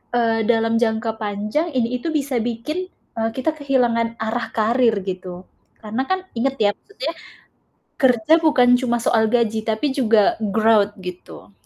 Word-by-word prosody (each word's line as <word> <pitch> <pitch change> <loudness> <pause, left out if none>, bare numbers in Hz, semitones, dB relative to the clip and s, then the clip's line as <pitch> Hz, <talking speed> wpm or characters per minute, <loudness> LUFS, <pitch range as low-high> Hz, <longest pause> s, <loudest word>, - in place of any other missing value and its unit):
eee, 225 -1 +2
dalam 225 -1 +2
jangka 225 -1 0
panjang 210 +9 -2
ini 250 0 0
itu 330 - -5
bisa 275 -4 -1
bikin, 245 +11 -3 0.3
eee, 225 0 0
kita 265 +5 0
kehilangan 240 -5 +1
arah 225 +1 -2
karir, 230 +1 +2
gitu. 185 -1 -6 0.4
Karena 220 +4 -2
kan, 375 0 0 0.2
inget 270 +3 0
ya, 205 - +5
maksudnya, 410 +4 -6 0.9
kerja 250 0 +3
bukan 285 -6 +4
cuma 240 -2 0
soal 225 -3 +3
gaji 225 -2 +1
tapi 225 +6 0
juga 225 -6 +3
growth 215 0 +2
gitu. 175 - -10
230 Hz, 145 wpm, -21 LUFS, 220-255 Hz, 0.9 s, ya